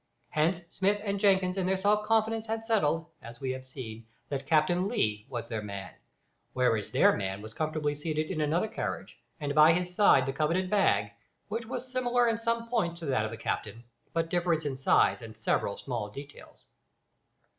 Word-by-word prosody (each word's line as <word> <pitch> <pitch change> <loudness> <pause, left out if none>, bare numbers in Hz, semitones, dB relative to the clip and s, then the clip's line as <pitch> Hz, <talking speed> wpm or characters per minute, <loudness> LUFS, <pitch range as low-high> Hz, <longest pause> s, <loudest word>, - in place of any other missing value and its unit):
Hence 165 +3 +1
Smith 200 +2 +1
and 200 -1 -1
Jenkins 190 -2 +3
in 185 -1 0
their 190 0 +2
self 210 +2 +2
confidence 225 0 +1
had 225 0 -3
settled, 165 -8 +2 0.2
as 120 0 -11
we 130 -1 -2
have 130 0 -5
seen, 115 -4 -9 0.2
that 135 -1 -4
Captain 175 +4 +3
Lee 105 - -1
was 120 -2 -4
"their 110 -2 -3
man," 100 -2 -7 0.6
whereas 115 -5 +1
their - - +4
man 95 -1 -3
was 110 0 -9
comfortably 155 0 -1
seated 155 +2 -2
in 160 -4 -2
another 160 +7 +1
carriage, 220 - -5 0.2
and 145 -2 -2
by 155 +2 +7
his 180 +1 -2
side 180 -9 +5
the 135 - -2
coveted 165 +6 0
bag, 105 - +3 0.4
which 225 +2 -3
was 250 +1 -5
similar 245 -1 +2
in 230 0 +1
some 230 0 -1
points 175 -8 -1
to - - -5
that 130 -6 +1
of - - -3
the 115 - -7
captain, 110 +2 -4 0.3
but 165 0 -1
different 170 -3 +1
in 140 -2 -2
size 130 -1 +3
and 110 -1 -9
in - - -31
several 100 - 0
small 120 -6 -4
details. 140 +6 -12
160 Hz, 190 wpm, -29 LUFS, 130-200 Hz, 0.6 s, by